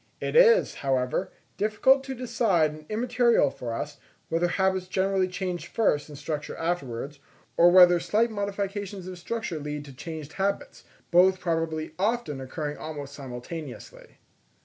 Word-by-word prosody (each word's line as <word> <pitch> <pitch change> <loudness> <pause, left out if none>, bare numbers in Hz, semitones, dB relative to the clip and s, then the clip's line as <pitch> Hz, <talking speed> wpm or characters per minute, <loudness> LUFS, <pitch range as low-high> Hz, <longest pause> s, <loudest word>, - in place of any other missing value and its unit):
It - - -3
is, 480 0 +6
however, 135 +5 0 0.3
difficult 240 +6 +3
to 265 -1 -5
decide 225 -10 +1
and 155 0 -12
immaterial 235 - +2
for 120 -2 -6
us, 145 +5 -5 0.3
whether 165 +2 +1
habits 190 0 0
generally 190 0 +1
change 180 -1 -4
first 150 -10 +1
and 145 - -9
structure 150 0 -4
afterwards; 145 -5 -3 0.4
or 170 +1 +7
whether 175 -1 +7
slight 225 +6 +1
modifications 200 -1 -4
of 185 -1 -8
structure 185 -4 -4
lead 150 0 -5
to 140 - -11
changed 155 +1 -7
habits; 200 +1 -2 0.3
both 185 +2 +5
probably 165 -3 -2
often 195 - -1
occurring 145 +3 -4
almost 145 -3 -7
simultaneously. 135 +2 -8
175 Hz, 140 wpm, -27 LUFS, 150-200 Hz, 0.4 s, or